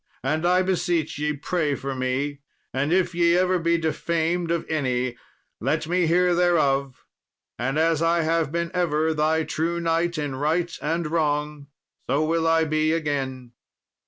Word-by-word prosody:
And, 155 +5 0
I 180 +1 +3
beseech 175 -5 -1
ye, 150 0 0
pray 150 0 -1
for 135 0 -4
me, 135 +3 -2 0.3
and 140 +4 0
if 185 0 +2
ye 170 0 +3
ever 185 0 +2
be 170 0 +2
defamed 165 +1 -1
of 170 -1 -1
any, 130 -5 -1 0.4
let - - -1
me 175 0 +1
hear 180 +2 +3
thereof, 140 -7 +1 0.5
and 135 +4 -1
as 160 0 +2
I 165 0 +2
have 160 -2 0
been 170 0 -2
ever 160 -3 +1
thy 155 +1 +1
true 165 +2 -2
knight 170 0 0
in 145 -3 -3
right 165 +5 0
and 165 +3 -1
wrong, 150 -2 -1 0.4
so 145 +4 +2
will 165 +1 +1
I 165 0 +4
be 155 0 +1
again." 135 -6 -3
160 Hz, 160 wpm, -24 LUFS, 145-170 Hz, 0.5 s, I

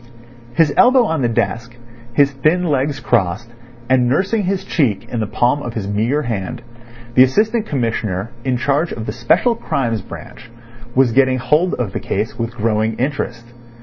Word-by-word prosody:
His 155 -3 +3
elbow 250 -1 +6
on 160 -7 -1
the 120 - +1
desk, 115 +1 -2 0.4
his 140 +3 +3
thin 155 +6 +1
legs 145 -3 0
crossed, 105 +1 0 0.4
and 125 -1 +3
nursing 195 - +1
his 190 0 -1
cheek 135 - 0
in 120 - -4
the 110 - -1
palm 125 +7 +1
of 120 -4 -6
his 105 -3 -3
meagre 115 +9 0
hand, 105 -3 -4 0.5
the 125 - +6
Assistant 215 - +3
Commissioner 115 - -2
in 130 -2 0
charge 140 +6 0
of 110 - -5
the 105 - -4
Special 125 - +2
Crimes 120 - -2
branch 120 +5 -11 0.5
was 130 -2 +4
getting 130 +1 +3
hold 150 +8 +1
of 115 -7 -3
the - - -2
case - - -3
with 115 +1 -3
growing 110 0 0
interest. 120 -3 -3
125 Hz, 170 wpm, -18 LUFS, 115-150 Hz, 0.5 s, elbow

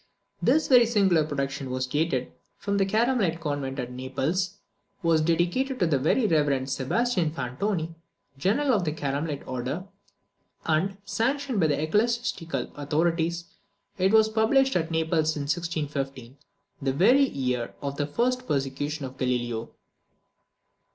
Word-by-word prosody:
This 315 +1 +3
very 245 -3 +6
singular 195 -8 +3
production 140 -2 -3
was 130 0 -1
dated 135 -1 -1 0.3
from 200 0 -1
the 195 - +2
Carmelite 215 -5 +1
convent 145 -4 -3
at 125 -2 -4
Naples; 140 +9 -2 0.5
was 165 -2 +3
dedicated 175 - +1
to 180 - +2
the 150 -5 +2
very 160 - +2
reverend 145 -7 +1
Sebastian 180 - +1
Fantoni, 160 +5 -2 0.4
general 225 - +1
of 205 -5 +2
the 155 -3 -1
Carmelite 145 0 -3
order; 130 +7 -3 0.8
and, 175 +5 +1
sanctioned 260 +3 -1
by 160 - +4
the 145 -1 0
ecclesiastical 170 - -1
authorities, 165 +3 0 0.5
it 190 +1 +3
was 220 0 +6
published 230 +5 +3
at 165 -1 0
Naples 160 -1 +1
in 145 - -2
1615, 140 -5 -3 0.5
the 135 -1 0
very 230 - +5
year 125 -3 -2
of 140 0 -3
the 145 - -1
first 250 +10 0
persecution 140 +1 -2
of 130 0 -9
Galileo. 120 -2 -1
160 Hz, 135 wpm, -26 LUFS, 140-200 Hz, 0.8 s, very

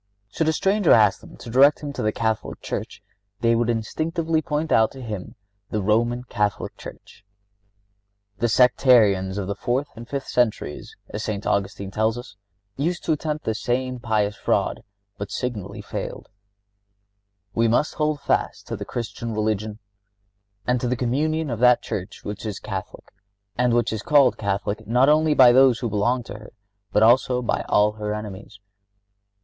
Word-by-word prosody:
Should 160 - -1
a - - +2
stranger 195 +2 +2
ask 105 -3 +4
them - - -14
to 120 - -10
direct 140 +5 +5
him 145 -1 -5
to - - -4
the 110 - +1
Catholic 110 0 -2
Church - - -6 0.4
they 115 0 +3
would 115 0 +1
instinctively 160 +8 -1
point 150 +1 -2
out 110 -1 +4
to 135 - -10
him 105 -5 -6 0.3
the 105 - -1
Roman 120 +4 +1
Catholic 105 -4 -2
Church. - - -12 1.2
The 120 - +1
sectarians 110 -6 +4
of 100 - -2
the 100 - -2
fourth 125 +7 -2
and 115 0 -10
fifth 140 -1 -4
centuries, 115 -11 -1
as 105 - -5
St. 105 -2 -4
Augustine 100 0 -1
tells 110 +3 0
us, 120 -4 -10 0.4
used 170 +5 -1
to - - +1
attempt 155 0 -2
the 110 - 0
same 125 +3 -2
pious 105 -4 0
fraud, - - 0 0.4
but 100 -1 -5
signally 105 -6 -5
failed: - - -6 1.2
"We 115 0 +2
must 120 +7 +1
hold 150 -1 -1
fast - - -1
to - - -2
the - - -6
Christian 115 -1 -5
religion 110 0 -1 0.9
and 125 -1 +1
to 125 - -1
the 125 - 0
communion 150 +5 0
of 115 - -3
that 125 0 +5
Church 95 -2 -6
which 105 0 -6
is 105 -3 -4
Catholic, 100 -3 -7 0.4
and 125 0 +2
which 120 -1 +1
is 110 - -3
called 140 0 +4
Catholic 100 0 -2
not 125 +5 +4
only 155 0 +3
by 125 -3 +8
those 130 -1 +5
who 120 -2 -3
belong 120 +4 +1
to - - -9
her, 105 - -14 0.4
but 105 - +3
also 125 +2 +4
by - - -1
all 105 +1 +4
her 105 0 -4
enemies. 105 -1 -8
120 Hz, 170 wpm, -23 LUFS, 105-130 Hz, 1.2 s, by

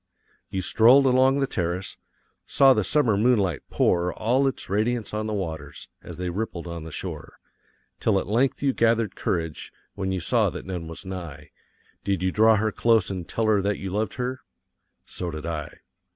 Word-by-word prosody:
So - - -41
you 95 -1 -2
strolled 125 +8 +5
along 130 +1 +4
the - - +3
terrace, 90 -3 -3 0.5
saw 135 -1 +6
the 110 - +1
summer 125 -3 +2
moonlight 100 - +2
pour 90 0 +1
all 125 +8 +1
its 135 - -3
radiance 110 +3 -1
on 110 0 -2
the 110 - -2
waters, 80 -7 -6
as - - -10
they 90 0 -3
rippled 95 -3 -4
on 85 -2 -6
the 80 - -8
shore, - - -7 0.6
till 100 -3 +2
at - - -4
length 125 +8 0
you 135 -2 +2
gathered 115 -3 +1
courage, 80 -3 -3 0.2
when 95 0 -3
you 95 - -1
saw - - +2
that - - -8
none 90 -3 -5
was 80 +4 -9
nigh 90 -6 -8 0.5
did 95 -2 -1
you 95 - +1
draw 110 +2 +5
her 110 +1 0
close 115 -4 +2
and 90 -2 -6
tell 115 - -1
her 105 -2 +3
that 100 +1 -1
you 95 -1 -5
loved 105 +3 -2
her? 130 +1 -3 0.6
So 90 - -5
did 75 -1 -6
I. 80 -4 -5
100 Hz, 190 wpm, -25 LUFS, 90-115 Hz, 0.6 s, saw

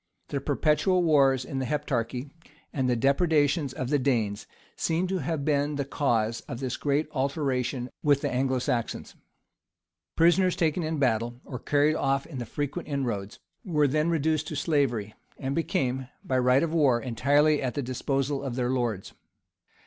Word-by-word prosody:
The 140 - -2
perpetual 155 +6 +2
wars 135 -5 +4
in 135 - -4
the 130 - -2
Heptarchy, 135 -2 -2 0.4
and 130 -3 0
the 125 - +2
depredations 145 +2 +2
of 130 -1 -4
the 145 - +3
Danes, 115 -6 0 0.3
seem 165 +3 0
to 185 0 -1
have 155 -1 -2
been 145 0 +1
the 140 -1 -2
cause 115 -5 0
of 120 -5 -6
this 130 -2 -2
great 145 +2 0
alteration 135 -3 -1
with 145 -2 +3
the - - -1
Anglo 130 +1 +1
Saxons. 120 -1 -2 1.0
Prisoners 175 +2 +4
taken 165 +1 +1
in 160 0 -2
battle, 120 -2 0
or 125 -4 -6
carried 145 +1 +2
off 135 -2 0
in 140 -6 -7
the 120 - -5
frequent 145 +7 -4
inroads, 120 -9 -3 0.3
were 150 -8 +2
then 155 +4 +1
reduced 155 -1 0
to 155 - -5
slavery, 135 - 0 0.2
and 135 0 -3
became, 130 -5 -1 0.2
by 130 -1 0
right 125 +3 +4
of 165 -1 -2
war,[] 140 -7 +4
entirely 145 +5 +2
at 130 -2 -2
the 145 - -1
disposal 135 +2 -1
of 135 -4 -4
their 125 -1 0
lords. 120 -7 -2
140 Hz, 165 wpm, -27 LUFS, 125-150 Hz, 1.0 s, wars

